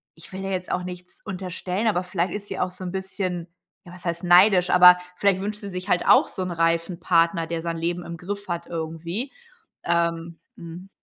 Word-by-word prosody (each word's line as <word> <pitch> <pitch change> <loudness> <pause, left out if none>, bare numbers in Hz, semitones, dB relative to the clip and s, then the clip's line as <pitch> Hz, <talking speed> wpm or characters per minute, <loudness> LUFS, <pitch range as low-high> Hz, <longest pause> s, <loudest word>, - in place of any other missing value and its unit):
ich 165 - -14
will 190 - -5
ihr 195 - -3
jetzt 185 -1 -3
auch 180 - -1
nichts 180 0 -9
unterstellen, 185 +2 -3
aber 185 -4 +1
vielleicht 180 -1 -2
ist 205 0 -5
sie - - -5
auch 180 0 0
so 185 +1 -10
'n 180 - -4
bisschen 190 -2 -4 0.4
ja, 175 - -12
was 180 - -12
heißt 170 0 -2
neidisch, 180 +1 +6
aber 180 0 +8 0.2
vielleicht 195 0 +2
wünscht 210 +1 -4
sie 200 - -6
sich 180 0 -6
halt 180 - +2
auch - - +6
so - - -6
'n 185 - -4
reifen 165 +1 0
Partner, 170 -2 +2
der 165 0 -3
sein 165 0 -3
Leben 175 +1 -2
im 170 0 -7
Griff 200 +4 -6
hat 170 -1 -3
irgendwie. 170 - -4 0.5
Ähm 170 -1 -1 0.2
mhm. 170 +3 -10
180 Hz, 210 wpm, -24 LUFS, 170-190 Hz, 0.5 s, aber